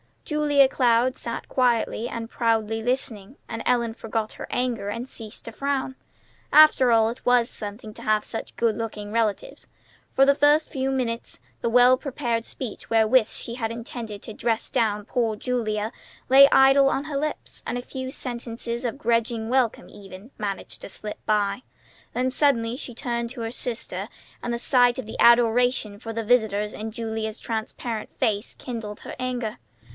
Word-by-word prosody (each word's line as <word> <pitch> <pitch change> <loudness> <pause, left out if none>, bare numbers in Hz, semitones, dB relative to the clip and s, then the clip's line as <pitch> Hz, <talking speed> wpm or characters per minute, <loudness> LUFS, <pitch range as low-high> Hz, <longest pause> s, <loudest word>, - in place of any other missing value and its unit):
Julia 295 -3 +4
Cloud 245 -1 +3
sat 235 - -5
quietly 240 -2 +1
and 230 -1 -5
proudly 225 -2 0
listening; 235 -2 -2
and 225 - -4
Ellen 235 -2 +1
forgot 225 -1 -3
her - - -8
anger, 240 -5 -1
and 230 +4 -4
ceased 220 -4 -9
to 230 - -6
frown. 265 +2 -2 0.6
After 305 -4 +7
all, 225 -1 +4
it 235 - -8
was 245 -1 +4
something 215 +1 -7
to - - -11
have 215 0 +2
such 225 - -5
good 230 -2 +1
looking 210 -2 -5
relatives. 225 - -1 0.5
For 270 - +6
the 280 - +6
first 295 +2 +3
few 265 -3 -2
minutes 245 -3 -2 0.2
the 235 - -1
well 250 +2 +6
prepared 245 -5 -2
speech 250 -6 -7
wherewith 225 +1 +4
she 235 - -7
had 225 -3 -2
intended 230 -3 -7
to 220 - -7
dress 225 +1 -1
down 215 -5 +1
poor 230 -2 0
Julia 215 -2 -2 0.4
lay 275 +2 +9
idle 270 +1 +6
on 275 - -1
her 295 -2 -4
lips, 305 +2 -4
and - - -2
a - - -3
few 260 0 -6
sentences 235 -1 -5
of 240 +3 -2
grudging 230 -3 0
welcome 250 -3 +1
even, 195 +4 -12
managed 200 -3 -4
to - - -8
slip 210 +1 -6
by. 205 0 +1 0.5
Then 255 +1 0
suddenly 245 -5 +2
she 250 -4 -7
turned 235 0 -2
to 250 -2 -7
her 225 0 -3
sister, 240 -1 -4 0.3
and 240 - -3
the 235 - -1
sight 245 -1 +4
of 260 - -4
the 220 - -8
adoration 235 -2 +4
for 225 0 -6
the 230 0 -2
visitors 215 -3 +2
in 220 +1 -5
Julia's 220 -1 -4
transparent 225 0 -4
face 210 +1 -1
kindled 220 -4 -6
her - - -8
anger. 245 - -3
235 Hz, 170 wpm, -25 LUFS, 220-255 Hz, 0.6 s, lay